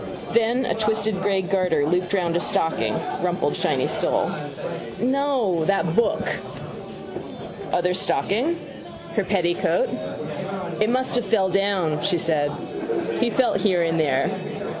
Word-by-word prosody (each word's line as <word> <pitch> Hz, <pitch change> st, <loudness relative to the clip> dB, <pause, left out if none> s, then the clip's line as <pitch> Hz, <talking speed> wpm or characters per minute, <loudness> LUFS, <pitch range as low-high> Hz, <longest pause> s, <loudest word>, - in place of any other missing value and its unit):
Then, 235 Hz, +3 st, +3 dB
a -, -, +1 dB
twisted 220 Hz, -2 st, 0 dB
grey 195 Hz, -1 st, +2 dB
garter 180 Hz, -6 st, +2 dB
looped 180 Hz, +3 st, +1 dB
round 175 Hz, -3 st, +1 dB
a -, -, +3 dB
stocking: 160 Hz, -1 st, +1 dB, 0.3 s
rumpled, -, -, 0 dB
shiny -, -, +1 dB
sole. -, -, +1 dB, 0.7 s
—No: 255 Hz, -, +1 dB
that 175 Hz, -3 st, +1 dB
book. 235 Hz, -, +2 dB, 1.4 s
Other 180 Hz, +1 st, +2 dB
stocking. 250 Hz, -, +1 dB, 0.6 s
Her 215 Hz, -, +2 dB
petticoat. 185 Hz, -, +1 dB, 0.9 s
—It 215 Hz, +1 st, +3 dB
must 255 Hz, +1 st, +1 dB
have 245 Hz, -2 st, +1 dB
fell 195 Hz, -2 st, +3 dB
down, 190 Hz, -5 st, +1 dB
she 185 Hz, -3 st, +2 dB
said. 155 Hz, -3 st, +1 dB, 0.7 s
He 240 Hz, -, +2 dB
felt 255 Hz, +1 st, +2 dB
here 185 Hz, -5 st, +3 dB
and 165 Hz, 0 st, +1 dB
there. 140 Hz, -3 st, +2 dB
195 Hz, 125 wpm, -23 LUFS, 175-230 Hz, 1.4 s, Then